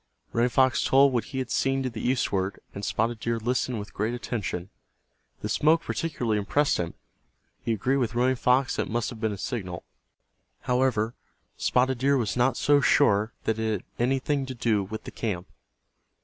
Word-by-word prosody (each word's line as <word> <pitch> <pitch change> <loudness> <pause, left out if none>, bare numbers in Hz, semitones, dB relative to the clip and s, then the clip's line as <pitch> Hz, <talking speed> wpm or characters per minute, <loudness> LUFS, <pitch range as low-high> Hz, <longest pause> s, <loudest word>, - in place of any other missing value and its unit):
Running 120 +2 +3
Fox 130 +1 +3
told 135 0 +5
what 120 - 0
he 130 - -7
had 130 -2 -3
seen 135 0 +1
to 130 - -1
the 110 - -6
eastward, 100 -6 0
and 100 - -7
Spotted 115 +2 0
Deer 115 0 -1
listened 125 +1 -1
with 105 0 -7
great 110 +4 -1
attention. 105 -6 -4 0.7
The - - -2
smoke 160 +2 +3
particularly 120 -10 -1
impressed 140 +8 +1
him. 85 -1 -3 0.7
He 115 - 0
agreed 130 +6 +1
with 120 -3 -1
Running 125 +2 +3
Fox 125 +2 +2
that - - 0
it - - -8
must 115 0 -1
have 110 -3 -10
been 110 -2 +1
a 100 - -5
signal. 95 -6 -4 0.8
However, 125 -3 +1 0.4
Spotted 130 0 +1
Deer 140 +2 +3
was 110 -6 -1
not 125 0 +2
so 145 0 +4
sure 105 -4 +3
that 110 0 0
it 110 0 0
had 100 - -3 0.2
anything 135 +2 0
to 130 - -5
do 110 -4 +1
with 110 +3 -6
the - - -8
camp. 95 -6 -3
120 Hz, 185 wpm, -27 LUFS, 110-130 Hz, 0.8 s, told